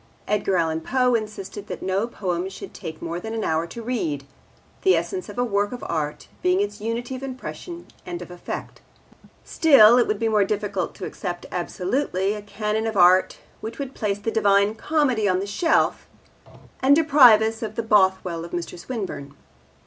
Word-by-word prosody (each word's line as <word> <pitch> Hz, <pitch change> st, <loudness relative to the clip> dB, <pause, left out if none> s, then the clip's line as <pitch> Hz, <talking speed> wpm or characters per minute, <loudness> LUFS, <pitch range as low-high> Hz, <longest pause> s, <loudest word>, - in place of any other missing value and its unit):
Edgar 200 Hz, -2 st, +1 dB
Allan 160 Hz, -1 st, 0 dB
Poe 250 Hz, +7 st, +1 dB
insisted 210 Hz, -2 st, -4 dB
that -, -, -6 dB
no 190 Hz, +4 st, 0 dB
poem 185 Hz, -5 st, -3 dB
should 190 Hz, -, -10 dB
take 160 Hz, -1 st, -8 dB
more 170 Hz, +1 st, -3 dB
than 220 Hz, +4 st, -5 dB
an 220 Hz, -, -2 dB
hour 160 Hz, +1 st, 0 dB
to 230 Hz, +7 st, -8 dB
read, 165 Hz, -, -2 dB, 0.6 s
the 380 Hz, -, +5 dB
essence 375 Hz, -2 st, -3 dB
of -, -, -9 dB
a 245 Hz, -, +2 dB
work 205 Hz, -3 st, 0 dB
of 250 Hz, -, -7 dB
art 150 Hz, -2 st, -3 dB
being 180 Hz, +1 st, +2 dB
its 205 Hz, 0 st, -2 dB
unity 235 Hz, +4 st, -3 dB
of 255 Hz, -, -7 dB
impression 275 Hz, +6 st, -7 dB, 0.2 s
and 175 Hz, -1 st, -6 dB
of 175 Hz, 0 st, -9 dB
effect. 175 Hz, -, -7 dB, 0.6 s
Still, 250 Hz, -7 st, +6 dB
it 240 Hz, -, +3 dB
would 215 Hz, -, 0 dB
be 225 Hz, -, 0 dB, 0.2 s
difficult 200 Hz, -3 st, -2 dB
to -, -, -6 dB
accept 175 Hz, -2 st, -5 dB
absolutely 190 Hz, +3 st, -1 dB
a 210 Hz, -, -6 dB
canon 210 Hz, +2 st, -2 dB
of 220 Hz, -2 st, -3 dB
art 185 Hz, +1 st, +5 dB, 0.2 s
which 220 Hz, +1 st, -7 dB
would 275 Hz, -2 st, -5 dB
place 205 Hz, -2 st, -1 dB
the 205 Hz, +2 st, -3 dB
Divine 200 Hz, -1 st, +3 dB
Comedy 255 Hz, -5 st, +1 dB
on 185 Hz, -, +2 dB
the 195 Hz, -, -3 dB
shelf 265 Hz, -, +1 dB, 0.7 s
and 275 Hz, +2 st, +6 dB
deprive 275 Hz, -8 st, +7 dB
us 225 Hz, +2 st, -2 dB
of 215 Hz, -1 st, -5 dB
the 230 Hz, -, -2 dB
Bothwell 190 Hz, -5 st, +2 dB
of 170 Hz, -, -10 dB
Mr. 175 Hz, 0 st, -4 dB
Swinburne. 175 Hz, -, -6 dB
210 Hz, 180 wpm, -23 LUFS, 180-235 Hz, 0.7 s, deprive